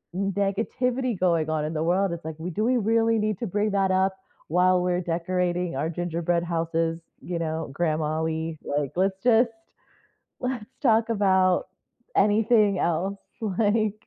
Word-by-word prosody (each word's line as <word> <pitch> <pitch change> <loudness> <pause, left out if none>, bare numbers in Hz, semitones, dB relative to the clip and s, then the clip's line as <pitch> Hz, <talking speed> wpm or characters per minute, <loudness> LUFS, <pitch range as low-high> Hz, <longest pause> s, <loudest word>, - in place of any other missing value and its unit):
negativity 205 +5 -1
going 165 -4 +2
on 155 -1 0
in 155 - -3
the 155 0 -1
world, 185 +2 +2
it's 170 -2 -8
like, 160 -1 -5
we 175 +3 -4
"Do 215 +7 -1
we 250 +2 +2
really 225 +1 +2
need 210 -2 -1
to 235 - -3
bring 210 +3 0
that 195 -1 +2
up 190 0 +1 0.3
while 180 +2 +3
we're 180 0 0
decorating 175 -1 -1
our 150 +4 -1
gingerbread 170 0 -1
houses, 165 -1 -1 0.2
you 175 -2 -4
know, 160 -2 -3
Grandma, 155 -1 0
we, 160 0 -2
like 145 -1 -2
let's 190 +1 +1
just 235 -1 +4 0.9
let's 250 -4 -3 0.2
talk 225 -3 +3
about 190 -4 +2 0.5
anything 210 -2 +4
else," 185 +4 0 0.4
like 215 -1 +1
185 Hz, 155 wpm, -25 LUFS, 165-210 Hz, 0.9 s, just